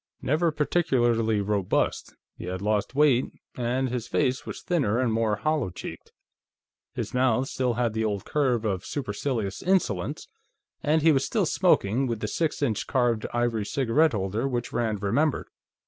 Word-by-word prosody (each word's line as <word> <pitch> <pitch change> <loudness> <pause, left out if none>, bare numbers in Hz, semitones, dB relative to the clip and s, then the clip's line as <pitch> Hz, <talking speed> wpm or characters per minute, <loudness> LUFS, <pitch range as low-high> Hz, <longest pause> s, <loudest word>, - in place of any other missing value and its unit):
Never 160 +4 +2
particularly 120 -9 +1
robust, 100 -2 -1 0.2
he - - -8
had 90 +1 -4
lost 105 +4 -1
weight, 140 -4 +4 0.3
and 125 +2 0
his 125 -2 -3
face 130 -3 0
was - - -7
thinner 140 - +1
and 125 -3 +1
more 110 -1 +1
hollow 150 +1 0
cheeked. 90 - -9 0.8
His - - -4
mouth 125 0 +2
still 125 -4 -1
had 120 -2 0
the 110 0 -1
old 105 -3 -2
curve 125 -6 +1
of 95 -3 -1
supercilious 110 -5 -3
insolence, 165 - 0 0.5
and 155 +1 +2
he 165 - +6
was 135 -2 +2
still - - 0
smoking 115 +7 +2
with 115 -3 -2
the 105 - -3
six 155 +6 -1
inch 115 -7 -1
carved 120 -4 +1
ivory 120 -2 0
cigarette 140 +3 +2
holder 105 +5 -1
which 120 -2 -3
Rand 110 -4 -1
remembered. 140 +9 +1
120 Hz, 160 wpm, -26 LUFS, 105-135 Hz, 0.8 s, he